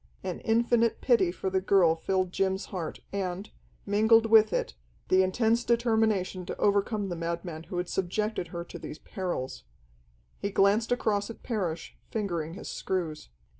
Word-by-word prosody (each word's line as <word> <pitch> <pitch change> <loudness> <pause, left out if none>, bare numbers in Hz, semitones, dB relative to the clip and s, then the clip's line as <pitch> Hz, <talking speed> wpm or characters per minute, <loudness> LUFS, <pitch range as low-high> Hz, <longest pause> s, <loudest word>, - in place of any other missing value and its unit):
An 185 -2 -4
infinite 230 0 +2
pity 230 -9 +3
for 190 +1 -3
the 190 0 +1
girl 185 -4 +4
filled 185 +2 -1
Jim's 190 +1 0
heart, 170 -4 -4
and, 190 0 -3 0.3
mingled 220 +3 +4
with 220 -1 +6
it, - - -1 0.4
the 185 0 +5
intense 225 +5 +2
determination 220 -6 +1
to - - -5
overcome 205 0 +1
the 175 - -3
madman 170 -1 -4
who 180 - -6
had 180 0 -1
subjected 190 +1 -1
her 170 0 -5
to - - -10
these 150 - -7
perils. 175 - -4 0.8
He 200 - -2
glanced 205 +4 +3
across 215 -4 +1
at 230 - -10
Parrish, 180 -9 -3
fingering 170 -7 -3
his 210 - -8
screws. 165 - -3
195 Hz, 155 wpm, -28 LUFS, 175-220 Hz, 0.8 s, with